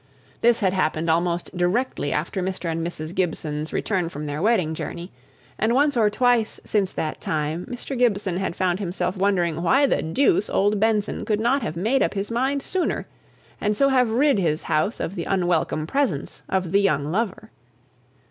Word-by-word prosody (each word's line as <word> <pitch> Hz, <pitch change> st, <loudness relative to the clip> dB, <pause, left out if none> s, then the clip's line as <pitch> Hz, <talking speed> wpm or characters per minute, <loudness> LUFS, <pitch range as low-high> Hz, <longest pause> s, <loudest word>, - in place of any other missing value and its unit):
This 235 Hz, 0 st, +4 dB
had 190 Hz, -2 st, +2 dB
happened 160 Hz, -3 st, +1 dB
almost 170 Hz, +2 st, -1 dB
directly 180 Hz, -, 0 dB
after 170 Hz, +6 st, -2 dB
Mr. 185 Hz, -2 st, -3 dB
and 165 Hz, 0 st, -2 dB
Mrs. 165 Hz, -1 st, -5 dB
Gibson's 155 Hz, -4 st, -2 dB
return 185 Hz, -5 st, -1 dB
from 150 Hz, -1 st, -6 dB
their 145 Hz, +1 st, -3 dB
wedding 190 Hz, -7 st, +2 dB
journey, 170 Hz, +3 st, -6 dB, 0.5 s
and 225 Hz, +3 st, +2 dB
once 285 Hz, +1 st, +3 dB
or 220 Hz, -3 st, +4 dB
twice 240 Hz, 0 st, +1 dB
since 200 Hz, -3 st, 0 dB
that 155 Hz, -, -3 dB
time 155 Hz, +2 st, -2 dB
Mr. 250 Hz, +2 st, -5 dB
Gibson 205 Hz, -7 st, +1 dB
had 190 Hz, -2 st, -2 dB
found 185 Hz, 0 st, 0 dB
himself 185 Hz, -1 st, -2 dB
wondering 180 Hz, -4 st, +1 dB
why 265 Hz, +12 st, +4 dB
the -, -, +1 dB
deuce 280 Hz, -, +2 dB
old 205 Hz, +1 st, +2 dB
Benson 215 Hz, -1 st, +1 dB
could 210 Hz, -1 st, 0 dB
not 250 Hz, +5 st, +2 dB
have 165 Hz, -8 st, -3 dB
made 225 Hz, +10 st, +1 dB
up -, -, +1 dB
his 200 Hz, +3 st, -3 dB
mind 265 Hz, +4 st, 0 dB
sooner, 370 Hz, -1 st, -1 dB, 0.6 s
and 210 Hz, 0 st, 0 dB
so 275 Hz, +3 st, +4 dB
have 250 Hz, -3 st, +3 dB
rid 265 Hz, +1 st, +3 dB
his 160 Hz, -4 st, 0 dB
house 155 Hz, +9 st, 0 dB
of 175 Hz, -, -3 dB
the 175 Hz, -4 st, -4 dB
unwelcome 175 Hz, -4 st, 0 dB
presence 225 Hz, -, -1 dB
of 185 Hz, -3 st, -1 dB
the 200 Hz, +1 st, +4 dB
young 155 Hz, -8 st, +2 dB
lover. 210 Hz, +5 st, -2 dB
190 Hz, 180 wpm, -23 LUFS, 170-230 Hz, 0.6 s, This